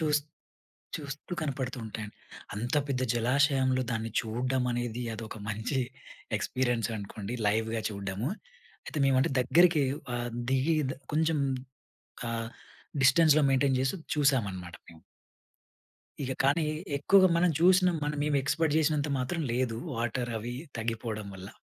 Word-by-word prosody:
చూస్తూ 150 -1 +1 0.7
చూస్తూ 145 +4 -7
కనపడుతూ 135 -4 -3
ఉంటాయండి. 110 -1 -6 0.4
అంత 115 +4 -2
పెద్ద 130 -2 0
జలాశయంలో 130 +2 +2
దాన్ని 115 -1 -2
చూడడం 125 +3 -1
అనేది 120 0 -2
అదొక 110 0 -7
మంచి 110 +6 -2 0.6
ఎక్స్పీరియన్స్ 120 +2 0
అనుకోండి. 100 +1 -6
లైవ్‌గా 110 +2 +1
చూడడము. 100 +3 -3 0.6
అయితే 155 - -4
మేము 135 -1 +4
అంటె 135 - +1
దగ్గరికి 165 +4 +5 0.3
ఆహ్, 120 0 -2 0.2
దిగి 135 +5 +2 0.4
కొంచెం 160 0 +2 0.9
ఆహ్, 115 -1 -3 0.5
డిస్టెన్స్‌లో 150 +3 +6
మెయింటైన్ 135 0 +3
చేసి 130 +8 0 0.2
చూసామనమాట. 105 - +1
మేము. 80 -1 -15 1.2
ఇక 130 - -2
కానీ 145 +4 +3 0.3
ఎక్కువగా 185 +6 +6
మనం 175 +1 +4
చూసినం 180 0 +5 0.3
మేము 150 -1 +1
ఎక్స్‌పెక్ట్ 150 +3 +1
చేసినంత 150 -1 +1
మాత్రం 130 +7 -2
లేదు. 120 -2 0 0.2
వాటర్ 120 +1 -1
అవి 120 +3 -5 0.2
తగ్గిపోవడం 110 -2 -3
వల్ల. 95 +1 -9
130 Hz, 120 wpm, -29 LUFS, 115-150 Hz, 1.2 s, డిస్టెన్స్‌లో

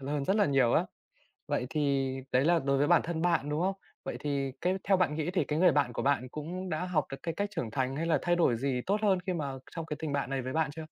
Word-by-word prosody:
l 135 - -7
hơn 145 -1 -1
rất 195 - +2
là 205 -2 +4
nhiều 135 -4 +3
á. - - +3 0.6
Vậy 125 - -1
thì 140 -3 0 0.2
đấy 130 +3 +3
là 170 0 +4
đối 140 0 +1
với 145 - +2
bản 175 -1 +5
thân 165 -1 -3
bạn, 170 -5 +1
đúng 150 +2 -1
không? 190 +2 +1 0.3
Vậy - - -4
thì 140 -2 -1
cái 185 +2 +1
theo 195 -1 +3
bạn 160 -5 +1
nghĩ 160 +3 -2
thì 185 - +1
cái 150 +1 -1
người 180 -2 +6
bạn 140 -5 +1
của - - -2
bạn 130 -3 +1
cũng 175 +6 -5
đã 165 +2 -2
học 165 -5 0
được 135 - -4
cái 165 - -2
cách 205 +4 -2
trưởng 115 -9 -3
thành 130 0 -1
hay 165 +3 -2
là 165 - +2
thay 175 0 +2
đổi 165 -9 +3
gì 130 -1 -1
tốt 205 +2 +1
hơn 195 -3 +3
khi 185 - +1
mà 145 -5 -3 0.2
trong 165 -1 -5
cái 150 - -4
tình 155 -3 -3
bạn 140 -3 -1
này 135 -1 -1
với 130 +3 -4
bạn 160 -3 +1
chưa? 160 -1 -6
150 Hz, 295 wpm, -30 LUFS, 135-175 Hz, 0.6 s, người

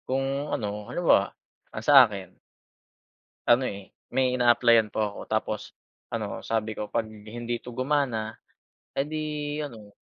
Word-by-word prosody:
Kung 135 +2 -1
ano 105 -1 -3
ano - - -3
ba? - - +7 0.5
Ang 110 - -6
sa 140 -3 +9
akin 100 -3 -8 1.2
Ano 120 +2 +5
eh, 100 -4 -6 0.2
may 130 -1 +2
ina-applyan 120 -3 +4
po - - -2
ako 105 -1 -2
tapos 110 -1 -1 0.5
ano - - -4
sabi 110 -1 -1
ko 105 - -2
'pag 115 -1 0
hindi 115 +3 -5
'to 120 +1 -10
gumana, 130 -4 0 0.6
eh 135 - +2
di 155 +1 -4 0.4
ano 115 -8 -8
115 Hz, 145 wpm, -27 LUFS, 110-130 Hz, 1.2 s, sa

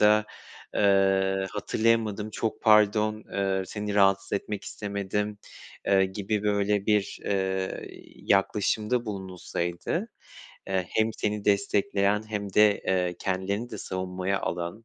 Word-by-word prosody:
da, 105 0 +5 0.5
eee, 95 -1 +3
"Hatırlayamadım 110 0 0
çok 110 +1 -3
pardon." 105 0 +4
eee, 95 -1 0
"Seni 105 0 -4
rahatsız 95 -1 +3
etmek 100 0 -3
istemedim." 105 0 -3 0.5
eee, 95 -1 +4
gibi 100 +2 -2
böyle 100 -1 +1
bir, 105 -2 +1
eee, 95 -1 -1 0.3
yaklaşımda 105 +4 +1
bulunulsaydı, 95 - -3 0.6
eee, 95 -2 0
hem 110 +1 +2
seni 105 -1 -1
destekleyen 100 -1 +2
hem 100 -3 -4
de, 105 -1 +5
eee, 90 -2 +1
kendilerini 100 +5 -2
de - - -6
savunmaya 95 +1 -2
alan, 85 +6 -4
100 Hz, 115 wpm, -27 LUFS, 95-105 Hz, 0.6 s, da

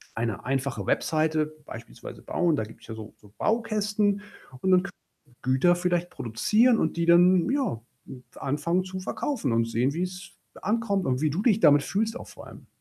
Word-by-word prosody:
eine 115 -2 -3
einfache 135 +1 -2
Webseite 155 -1 0
beispielsweise 110 - -10
bauen. 170 -3 +1
Da 110 - -1
gibt's 110 +1 -13
ja 110 - -6
so 110 0 -10
so 105 -1 -20
Baukästen 210 -2 0 0.4
und 190 - +1
dann 180 -1 +6
Gü - - -6 0.5
Güter 130 +8 +3
vielleicht 175 0 -1
produzieren 215 - +2
und 160 - -1
die 170 - +1
dann, 175 +1 +5
ja, 265 - -1 0.6
anfangen 150 +6 -1
zu 185 0 -6
verkaufen 210 - -2
und 115 0 +2
sehen, 120 +4 +1
wie's 180 +1 -5 0.3
ankommt 205 -2 0
und 130 -1 0
wie 155 - +2
du 165 +7 -2
dich 220 -3 +3
damit 145 0 +6
fühlst 220 - -1
auch - - -10
vor - - -12
allem. - - -14
175 Hz, 175 wpm, -26 LUFS, 135-200 Hz, 0.6 s, dann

